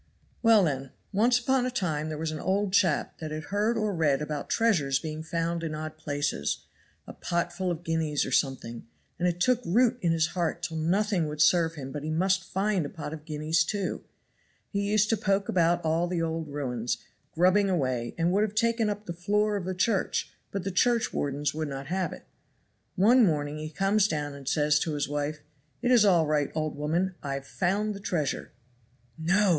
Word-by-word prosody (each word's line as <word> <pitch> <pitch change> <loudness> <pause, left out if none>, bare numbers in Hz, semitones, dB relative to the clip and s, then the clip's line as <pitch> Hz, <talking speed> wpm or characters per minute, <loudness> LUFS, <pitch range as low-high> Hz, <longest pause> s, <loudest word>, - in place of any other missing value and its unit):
"Well, 225 -3 +6
then. 135 -4 -2 0.2
Once 235 +5 +4
upon 255 +1 +1
a - - 0
time 155 -10 -2
there 155 - -4
was 160 0 -2
an 155 - -5
old 195 +2 0
chap 175 -6 +2
that 155 - -5
had 155 +1 -5
heard 215 +3 +1
or 215 -2 0
read 150 -5 +2
about 150 -1 -4
treasures 170 - +2
being 155 +1 -5
found 165 +1 -2
in 155 -2 -3
odd 155 0 -5
places, 145 - -2 0.4
a - - -9
pot 170 0 -2
full 185 +1 -2
of 175 -1 -3
guineas 160 -3 0
or - - -5
something; 125 -4 -1 0.3
and 180 - +2
it 175 0 -1
took 250 +5 +3
root 240 +7 +2
in 170 - +2
his 165 0 +2
heart 170 -4 -2
till 160 - -3
nothing 180 +1 +1
would 150 0 -6
serve 165 +2 +4
him 135 -3 -7
but 150 - -5
he 155 - -4
must 185 +4 +1
find 195 -2 0
a 145 - -4
pot 155 -1 -6
of 155 -1 -9
guineas, 155 +1 +1
too; 195 +2 -3 0.7
he 200 -1 -1
used 210 0 +3
to 225 - +2
poke 195 -1 0
about 175 -2 +2
all 165 +2 +1
the 175 -1 -2
old 165 -1 -2
ruins, 125 -5 -2 0.4
grubbing 185 +4 +4
away, 130 -9 -1
and 170 +1 +2
would 200 +3 +2
have 215 -1 -1
taken 230 -1 +2
up 210 0 -4
the 170 - -4
floor 205 +4 +1
of 195 -3 -3
the 185 0 -3
church, 195 +2 0 0.2
but 195 -2 -4
the 195 - -2
churchwardens 145 - +1
would 155 0 -3
not 135 -1 -5
have 185 +1 -1
it. - - -10 0.7
One 235 +7 +5
morning 150 -5 0
he 155 0 -5
comes 195 +5 +2
down 150 -5 -3
and 140 -1 -6
says 150 +1 +3
to 155 -1 -2
his 145 - -1
wife, 145 +1 -3 0.4
'It 245 - +2
is 240 -4 +6
all 175 -5 +5
right, 150 -2 +1
old 155 -1 -1
woman, 165 +6 0
I've 140 -1 -4
found 200 +7 0
the 200 - -8
treasure.' 170 -7 -2 0.7
"'No! 190 +5 +3
165 Hz, 205 wpm, -28 LUFS, 150-200 Hz, 0.7 s, Well